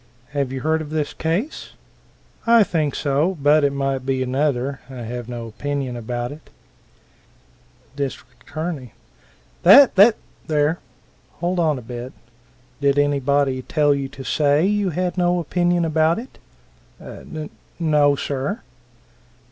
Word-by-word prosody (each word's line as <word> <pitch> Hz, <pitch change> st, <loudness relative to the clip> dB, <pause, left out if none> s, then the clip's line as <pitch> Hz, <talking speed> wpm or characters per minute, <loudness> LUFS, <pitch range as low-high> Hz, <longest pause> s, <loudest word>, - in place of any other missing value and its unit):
"Have 140 Hz, -2 st, -2 dB
you 130 Hz, -1 st, -4 dB
heard 160 Hz, +2 st, +1 dB
of 150 Hz, -, -7 dB
this 155 Hz, -1 st, -2 dB
case?" 180 Hz, -, -3 dB, 0.7 s
"I 230 Hz, -1 st, +7 dB
think 155 Hz, -7 st, -1 dB
so 150 Hz, +6 st, 0 dB
but 145 Hz, +2 st, +4 dB
it 140 Hz, -, +3 dB
might 135 Hz, -1 st, -2 dB
be 130 Hz, 0 st, 0 dB
another. 135 Hz, 0 st, -1 dB
I 125 Hz, -3 st, -7 dB
have 120 Hz, +1 st, -6 dB
no 120 Hz, -1 st, -5 dB
opinion 135 Hz, +2 st, -4 dB
about 120 Hz, +1 st, -4 dB
it." 150 Hz, +1 st, -12 dB, 1.5 s
Dist. 140 Hz, -2 st, -2 dB, 0.4 s
A. 155 Hz, -6 st, -4 dB, 0.7 s
"Tha 260 Hz, +9 st, +8 dB
tha 210 Hz, +3 st, +7 dB, 0.3 s
there! 155 Hz, +2 st, +1 dB, 0.5 s
Hold 175 Hz, +2 st, -2 dB
on 155 Hz, -4 st, +2 dB
a 125 Hz, -, -8 dB
bit? 120 Hz, +2 st, -7 dB, 0.7 s
Did 140 Hz, -1 st, +2 dB
anybody 140 Hz, -2 st, +1 dB
tell 145 Hz, +2 st, +2 dB
you 140 Hz, -1 st, -3 dB
to 135 Hz, -, -10 dB
say 145 Hz, +4 st, +2 dB
you 205 Hz, -1 st, +1 dB
had 180 Hz, +2 st, -2 dB
no 175 Hz, 0 st, +2 dB
opinion 175 Hz, +1 st, +1 dB
about 160 Hz, +1 st, +2 dB
it?" 245 Hz, +4 st, -9 dB, 0.6 s
"N 155 Hz, -1 st, -8 dB, 0.3 s
n 160 Hz, -2 st, 0 dB
o, 145 Hz, -1 st, +5 dB
sir." 140 Hz, -, -3 dB
145 Hz, 140 wpm, -21 LUFS, 135-165 Hz, 1.5 s, Tha